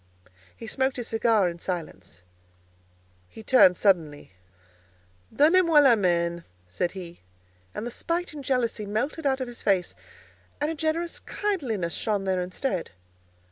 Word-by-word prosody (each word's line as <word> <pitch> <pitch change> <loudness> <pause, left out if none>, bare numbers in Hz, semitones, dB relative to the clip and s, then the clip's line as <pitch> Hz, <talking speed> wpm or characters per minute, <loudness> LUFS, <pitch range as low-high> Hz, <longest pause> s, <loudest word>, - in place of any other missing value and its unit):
He 230 - -9
smoked 265 +4 -1
his 245 - -5
cigar 225 -3 +2
in 170 0 -5
silence. 95 - -6 1.1
He 220 - -12
turned 200 -8 +6
suddenly. 160 - +1 1.0
"Donnez 335 +6 +5
moi 330 -3 +3
la 270 -5 +6
main," 170 -3 0 0.2
said 170 - -3
he, 175 -3 -9 0.6
and 220 - -4
the 240 - -4
spite 340 +5 -3
and 290 -2 -8
jealousy 235 -5 -1
melted 275 +9 -2
out 265 -1 0
of 255 - -3
his 240 -1 -10
face, 190 -3 +1 0.7
and 295 +2 0
a - - -2
generous 320 +2 -2
kindliness 245 - -2
shone 210 -3 -1
there 190 -1 0
instead. 185 +2 -3
220 Hz, 140 wpm, -26 LUFS, 180-275 Hz, 1.1 s, turned